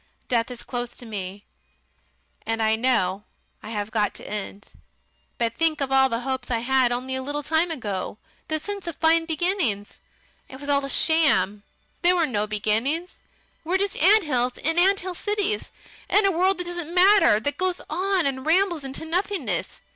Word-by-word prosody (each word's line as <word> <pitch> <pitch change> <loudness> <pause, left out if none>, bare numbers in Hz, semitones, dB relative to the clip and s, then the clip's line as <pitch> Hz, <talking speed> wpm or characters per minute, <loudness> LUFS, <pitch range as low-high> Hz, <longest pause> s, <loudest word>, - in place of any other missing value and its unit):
Death 230 -2 +1
is 250 -1 -8
close 245 -1 -4
to 245 - -9
me, 200 -2 -6 1.0
and 225 0 -2
I 220 0 +2
know 220 -5 +1 0.4
I - - -9
have 210 -1 -4
got 210 -2 0
to - - -10
end. 205 -1 -7 0.6
But 230 -1 -1
think 325 +1 +1
of 275 -1 -2
all 265 0 +4
the 230 0 -2
hopes 260 -1 -4
I 240 - +1
had 250 +1 +2
only 255 +2 -3
a 260 - -2
little 290 +2 -4
time 320 +4 +1
ago, 205 - -4 0.3
the 315 - 0
sense 400 +2 -6
of 335 - -4
fine 325 +1 +3
beginnings!... 320 - -1 0.5
It 265 - -10
was 285 0 -7
all 280 -1 +2
a 275 - -4
sham. 270 - +3 0.4
There 355 +1 +4
were 340 -2 +2
no 215 -7 -1
beginnings.... 225 - -1 0.4
We're 350 +4 +1
just 400 +1 0
ants 300 - +4
in 325 +2 +1
ant 390 +2 +4
hill 370 0 -5
cities, 415 +2 -1 0.4
in 415 0 +4
a 390 - +4
world 370 +3 +2
that 360 - -3
doesn't 345 -1 -5
matter; 375 - +6
that 285 +6 -3
goes 370 -1 0
on 370 +3 0
and 265 -1 -2
rambles 340 0 +2
into 270 +3 -5
nothingness. 325 - -2
280 Hz, 180 wpm, -24 LUFS, 230-350 Hz, 1.0 s, matter